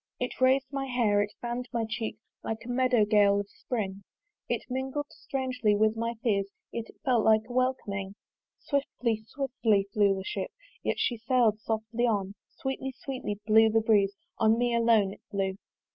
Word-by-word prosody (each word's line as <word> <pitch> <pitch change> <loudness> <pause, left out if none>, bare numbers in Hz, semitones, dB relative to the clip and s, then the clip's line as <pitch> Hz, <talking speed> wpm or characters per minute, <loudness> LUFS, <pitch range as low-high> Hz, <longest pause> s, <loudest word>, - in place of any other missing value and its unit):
It 250 +1 -4
rais'd 260 +1 +4
my 275 -1 -2
hair, 230 -5 +2
it 205 0 -2
fann'd 240 +1 -3
my 235 -2 0
cheek, 220 -1 -3 0.3
Like 225 0 -4
a - - -8
meadow 245 -3 +3
gale 205 -1 +4
of 200 - -3
spring 200 -5 -4 0.5
It - - -1
mingled 265 +3 -3
strangely 255 -5 -1
with 215 +1 +3
my 230 +1 -2
fears, 200 -5 +1 0.2
Yet 230 -1 -4
it - - -15
felt 245 -5 +3
like 220 0 +5
a 245 - -8
welcoming. 205 -7 -1 0.4
Swiftly, 245 -6 -1
swiftly 240 -7 +1
flew 200 -2 +4
the 190 - -5
ship, 190 0 -3 0.3
Yet - - -1
she 240 - 0
sail'd 230 -2 +2
softly 225 +2 -1
too: 200 -3 0 0.2
Sweetly, 265 0 -4
sweetly 250 -7 -5
blew 220 +1 +6
the 225 +1 +3
breeze 205 -3 +3 0.2
On 220 0 +4
me 240 0 +1
alone 230 -4 +3
it - - -16
blew. 195 -1 -1
225 Hz, 175 wpm, -29 LUFS, 205-250 Hz, 0.5 s, blew